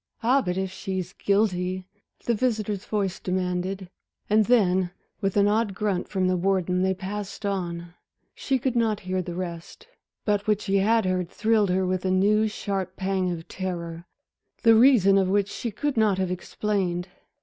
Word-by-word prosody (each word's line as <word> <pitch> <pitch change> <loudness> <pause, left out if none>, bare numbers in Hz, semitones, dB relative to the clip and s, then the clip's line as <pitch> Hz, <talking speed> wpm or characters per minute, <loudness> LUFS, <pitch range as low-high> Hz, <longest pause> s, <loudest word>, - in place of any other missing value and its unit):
"Ah, 260 +4 +4
but 180 -5 -2
if 190 -1 -2
she's 190 -1 -4
guilty," 185 -3 0 0.4
the 235 - +2
visitor's 215 -4 -1
voice 200 -4 -1
demanded. 185 +1 -2 0.4
And 215 0 +5
then, 190 -6 +3 0.3
with 195 0 0
an 200 0 +5
odd 210 -1 +1
grunt 200 -3 -1
from 190 -2 0
the 185 - +2
warden, 180 0 +1
they 190 0 +1
passed 205 +2 -6
on. 175 -3 -3 0.4
She 270 - 0
could 255 0 -1
not 225 -3 +1
hear 185 -1 -2
the 175 -1 -6
rest. 170 -2 -7 0.4
But 205 -1 0
what 210 -1 +3
she 200 -2 0
had 220 +3 +3
heard 185 -2 0
thrilled 215 -1 +2
her 185 +1 +1
with 185 0 -1
a 190 - 0
new, 210 +4 +3
sharp 195 -3 -3
pang 190 -1 -1
of 165 -1 -6
terror, 170 -2 -5 0.6
the 230 - +7
reason 220 -5 +6
of 190 -1 +1
which 200 0 +2
she 235 - -4
could 270 +5 -2
not 215 -4 +3
have 185 -1 -1
explained. 180 -1 -2
190 Hz, 170 wpm, -25 LUFS, 185-210 Hz, 0.6 s, the